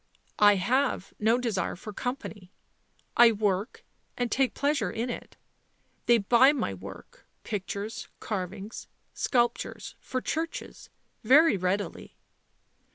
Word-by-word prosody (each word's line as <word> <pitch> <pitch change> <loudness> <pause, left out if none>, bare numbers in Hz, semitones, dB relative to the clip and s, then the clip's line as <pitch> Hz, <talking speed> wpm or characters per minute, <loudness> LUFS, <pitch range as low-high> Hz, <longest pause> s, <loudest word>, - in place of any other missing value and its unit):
ct - - -38 0.2
I 205 -1 +7
have 245 +2 0
no 225 +3 +3
desire 225 -7 -1
for 210 +4 -9
company. 215 -6 -5 0.6
I 240 -1 +8
work 205 -1 -1 0.3
and 245 -1 -1
take 265 -1 +1
pleasure 280 -8 +1
in 235 +6 -3
it. - - -8 0.7
They 235 - +6
buy 240 +6 +5
my 245 - -2
work, 95 +1 -11 0.2
pictures, 205 +1 -4
carvings, 195 +1 -5 0.3
sculptures 240 -2 -1
for 255 - -3
churches 320 +5 -4 0.2
— - - -43
very 315 -3 +7
readily." 190 +2 -3
225 Hz, 120 wpm, -28 LUFS, 200-250 Hz, 0.7 s, I